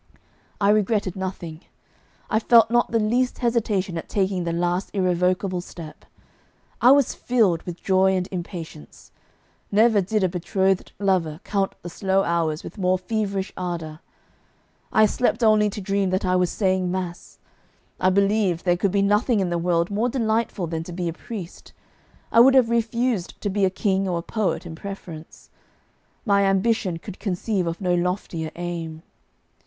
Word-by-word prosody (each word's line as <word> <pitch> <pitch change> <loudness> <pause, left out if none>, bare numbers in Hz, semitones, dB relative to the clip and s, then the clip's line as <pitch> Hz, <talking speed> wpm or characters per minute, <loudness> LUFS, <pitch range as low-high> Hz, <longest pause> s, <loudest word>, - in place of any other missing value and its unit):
I 200 - +3
regretted 210 -3 +1
nothing; 180 -4 -6 0.7
I 220 - +1
felt 230 -1 +5
not 240 0 +3
the 230 - +1
least 240 +4 +1
hesitation 210 -7 0
at - - -10
taking 190 -3 0
the 170 - -1
last 175 +2 -1
irrevocable 180 0 +1
step; 165 -3 -11 0.8
I 245 - +7
was 275 -1 +5
filled 215 -9 +1
with 175 0 -7
joy 190 0 +3
and 180 -1 -1
impatience. 170 - -8 0.6
Never 215 0 +4
did 205 +2 -1
a - - +4
betrothed 190 +2 0
lover 180 -6 0
count 195 -1 -1
the 175 - -6
slow 195 +1 +1
hours 165 -3 -1
with - - -9
more 185 0 +2
feverish 195 0 -3
ardour; 165 -4 -5 0.9
I 215 - +5
slept 245 +3 0
only 215 -1 +4
to 205 - -6
dream 195 0 0
that 185 +1 -1
I 185 0 +2
was 180 -1 +2
saying 185 -2 0
mass; 180 -1 -5 0.6
I 185 - +3
believed 195 -2 +1
there 175 -1 +3
could 195 - +1
be 200 0 +2
nothing 210 +3 +2
in 185 -3 -1
the 170 - 0
world 170 +1 0
more 220 +5 0
delightful 225 -5 -1
than 165 -1 -3
to 180 - -8
be 175 0 -3
a - - -4
priest; 190 -2 -9 0.6
I - - +5
would 265 +3 +7
have 245 -3 +4
refused 235 -3 -1
to 205 - -2
be 200 0 +2
a - - +3
king 190 0 0
or 175 - -1
a 170 - -4
poet 210 -2 -2
in 165 - -7
preference. 165 -3 -9 0.7
My 200 -2 +3
ambition 195 -2 +1
could 190 +3 -10
conceive 195 -1 -1
of 165 0 -3
no 180 -2 0
loftier 175 -2 -2
aim. 170 -2 -5
190 Hz, 165 wpm, -23 LUFS, 175-210 Hz, 0.9 s, I